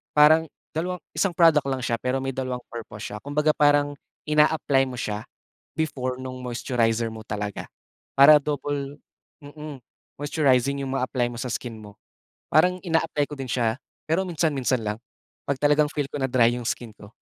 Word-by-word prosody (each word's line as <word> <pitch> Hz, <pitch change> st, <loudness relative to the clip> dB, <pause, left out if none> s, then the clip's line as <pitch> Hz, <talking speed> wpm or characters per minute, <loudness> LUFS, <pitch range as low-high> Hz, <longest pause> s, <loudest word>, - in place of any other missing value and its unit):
parang 155 Hz, +2 st, +6 dB, 0.3 s
dalawang 180 Hz, +3 st, -2 dB, 0.2 s
isang 170 Hz, +3 st, 0 dB
product 155 Hz, -5 st, +5 dB
lang 130 Hz, -2 st, -2 dB
siya 115 Hz, -1 st, -1 dB
pero 130 Hz, +1 st, 0 dB
may 135 Hz, -, -1 dB
dalawang 125 Hz, -1 st, -4 dB
purpose 115 Hz, -2 st, -7 dB
siya. 105 Hz, -, -4 dB
Kumbaga, 150 Hz, +2 st, +1 dB
parang 145 Hz, -1 st, +3 dB, 0.3 s
ina-apply 150 Hz, -2 st, +3 dB
mo 125 Hz, -, -6 dB
siya, 105 Hz, -2 st, -3 dB, 0.5 s
before 130 Hz, -5 st, -2 dB
nung 130 Hz, -1 st, -7 dB
moisturizer 120 Hz, -2 st, 0 dB
mo 110 Hz, 0 st, -8 dB
talaga, 105 Hz, -2 st, -4 dB, 0.5 s
para 145 Hz, +2 st, +10 dB
double, 145 Hz, 0 st, -3 dB, 0.4 s
mm, 150 Hz, -1 st, -9 dB, 0.4 s
moisturizing 140 Hz, -2 st, +2 dB
yung 135 Hz, -, -4 dB
mga 125 Hz, -, -1 dB
apply 120 Hz, -2 st, 0 dB
mo 120 Hz, -, -8 dB
sa 125 Hz, -, -3 dB
skin 115 Hz, -1 st, -4 dB
mo. 105 Hz, -1 st, -12 dB, 0.6 s
Parang, 180 Hz, +4 st, +5 dB
ina-apply 165 Hz, -4 st, +1 dB
ko 145 Hz, -, -7 dB
din 135 Hz, -2 st, -5 dB
siya, 115 Hz, -1 st, 0 dB, 0.3 s
pero 165 Hz, +5 st, +1 dB
minsan-minsan 145 Hz, -7 st, 0 dB
lang. 105 Hz, +1 st, -2 dB, 0.5 s
Pag 140 Hz, -, +1 dB
talagang 150 Hz, 0 st, +4 dB
feel 145 Hz, -2 st, -2 dB
ko -, -, -3 dB
na 135 Hz, -, +2 dB
dry 120 Hz, -2 st, +4 dB
yung 120 Hz, 0 st, -5 dB
skin 120 Hz, -3 st, -4 dB
ko. 100 Hz, -, -13 dB
135 Hz, 170 wpm, -25 LUFS, 120-150 Hz, 0.6 s, para